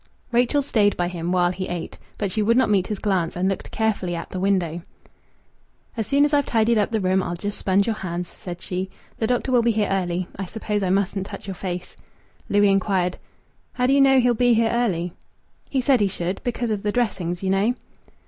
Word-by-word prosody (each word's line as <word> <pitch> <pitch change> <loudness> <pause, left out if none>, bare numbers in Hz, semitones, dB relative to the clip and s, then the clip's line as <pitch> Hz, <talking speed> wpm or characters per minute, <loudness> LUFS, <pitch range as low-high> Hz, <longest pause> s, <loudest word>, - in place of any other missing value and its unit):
Rachel 245 +4 +2
stayed 210 -6 +2
by 175 0 0
him 175 -1 -3
while 180 -1 +3
he 185 +1 -4
ate, 175 -2 -5 0.2
but 200 -3 -2
she 215 - 0
would 230 +3 +3
not 260 - +3
meet 190 -3 +2
his 210 - -3
glance, 190 -5 0
and 180 +2 0
looked 195 - -2
carefully 205 -5 -1
at 170 - -6
the 185 - -4
window. 180 -4 0 1.1
"As 225 -3 -2
soon 285 +1 +4
as 295 - -1
I've 285 -1 +3
tidied 225 0 +3
up 205 - +1
the 225 - 0
room, 185 0 +2
I'll 175 -1 -3
just 205 +4 -4
sponge 195 +1 +2
your 225 -2 -1
hands," 175 -2 -4
said 175 0 -9
she. 185 +1 -3 0.3
"The 220 - +1
doctor 250 +2 0
will 245 -2 +5
be 235 - +2
here 210 -1 +1
early. 180 -2 -1
I 195 - -2
suppose 210 +1 -3
I 190 - 0
mustn't 195 0 0
touch 200 - -8
your 195 - -4
face." 180 -1 -5 0.5
Louis 205 0 +4
inquired 190 -2 +1 0.6
"How 250 - 0
do 265 - +3
you 280 - +5
know 270 -1 +6
he'll 245 -1 +3
be 245 0 +3
here 225 0 +2
early?" 180 -8 0 0.6
"He 265 - +1
said 260 -1 +3
he 205 - +3
should 180 0 -3
because 240 -1 -2
of 210 -2 -1
the 210 - 0
dressings, 190 -7 -1
you 190 - +1
know." 205 +6 +2
200 Hz, 225 wpm, -23 LUFS, 180-230 Hz, 1.1 s, know